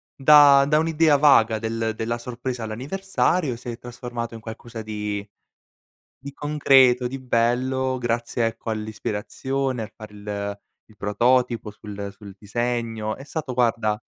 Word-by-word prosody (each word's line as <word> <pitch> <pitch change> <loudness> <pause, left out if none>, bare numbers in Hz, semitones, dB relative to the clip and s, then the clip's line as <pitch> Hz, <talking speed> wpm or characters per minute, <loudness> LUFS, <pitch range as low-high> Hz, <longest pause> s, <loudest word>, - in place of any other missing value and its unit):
da 140 0 +7
da 150 +1 +3
un'idea 160 -2 +3
vaga 115 -7 +5
del 115 0 -2
della 115 +1 -2
sorpresa 125 0 -5
all'anniversario 145 - -1
si 125 - -13
è 115 - -7
trasformato 120 -1 -6
in - - -8
qualcosa 115 +1 -8
di 105 -1 -4 0.9
di 140 +1 -9
concreto, 135 -4 +4
di 135 +2 -6
bello 130 +2 0
grazie 120 -1 -1
ecco 115 0 -5
all'ispirazione, 110 +4 -3
al 110 - -9
far 110 -1 -11
il 100 0 -5 0.3
il 105 - -22
prototipo 120 +2 +1
sul 100 -1 -7
sul 100 -2 -11
disegno; 115 0 -2
è 135 - -11
stato 150 -3 -5
guarda, 115 -3 +1
120 Hz, 135 wpm, -23 LUFS, 110-130 Hz, 0.9 s, da